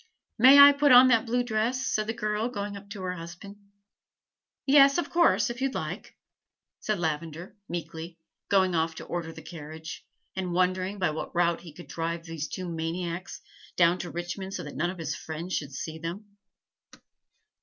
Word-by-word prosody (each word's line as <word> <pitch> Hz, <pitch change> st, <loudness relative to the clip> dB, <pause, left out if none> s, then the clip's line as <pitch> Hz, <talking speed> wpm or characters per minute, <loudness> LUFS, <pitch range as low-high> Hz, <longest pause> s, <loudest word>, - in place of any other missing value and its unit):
"May 260 Hz, +4 st, +9 dB
I 285 Hz, 0 st, +11 dB
put 285 Hz, 0 st, +3 dB
on 250 Hz, +1 st, +9 dB
that 230 Hz, -1 st, +3 dB
blue 245 Hz, +2 st, +1 dB
dress?" 245 Hz, +3 st, -1 dB
said 215 Hz, 0 st, 0 dB
the 225 Hz, -, -1 dB
girl, 215 Hz, +1 st, -1 dB
going 205 Hz, -3 st, -5 dB
up 200 Hz, 0 st, -11 dB
to 200 Hz, -2 st, -7 dB
her 180 Hz, 0 st, -2 dB
husband. 175 Hz, +4 st, -9 dB, 1.1 s
"Yes, 275 Hz, 0 st, +6 dB
of 345 Hz, -, -2 dB
course, 340 Hz, -7 st, +3 dB
if 240 Hz, +2 st, -8 dB
you 270 Hz, -, +2 dB
like," -, -, -6 dB, 0.6 s
said 215 Hz, -1 st, -1 dB
Lavender 160 Hz, +1 st, -4 dB
meekly, 165 Hz, 0 st, -6 dB, 0.3 s
going 190 Hz, -2 st, +3 dB
off 165 Hz, 0 st, 0 dB
to -, -, -8 dB
order 170 Hz, -2 st, -4 dB
the -, -, -11 dB
carriage, 160 Hz, -1 st, -9 dB, 0.3 s
and 185 Hz, -2 st, -3 dB
wondering 185 Hz, +2 st, 0 dB
by 180 Hz, -5 st, +1 dB
what 155 Hz, -, -6 dB
route 170 Hz, -1 st, +2 dB
he 170 Hz, -2 st, -11 dB
could 175 Hz, -, -11 dB
drive 165 Hz, 0 st, -4 dB
those 165 Hz, -2 st, -5 dB
two 185 Hz, -1 st, -6 dB
maniacs 170 Hz, +2 st, -4 dB, 0.3 s
down 175 Hz, +1 st, +4 dB
to 175 Hz, -, -5 dB
Richmond 175 Hz, +4 st, -5 dB
so -, -, -4 dB
that 145 Hz, -, -9 dB
none 175 Hz, +4 st, 0 dB
of 185 Hz, -, -6 dB
his 165 Hz, -, -3 dB
friends 165 Hz, +3 st, -6 dB
should 145 Hz, -2 st, -2 dB
see 160 Hz, +4 st, -6 dB
them. 170 Hz, +6 st, -6 dB
180 Hz, 180 wpm, -27 LUFS, 165-215 Hz, 1.1 s, I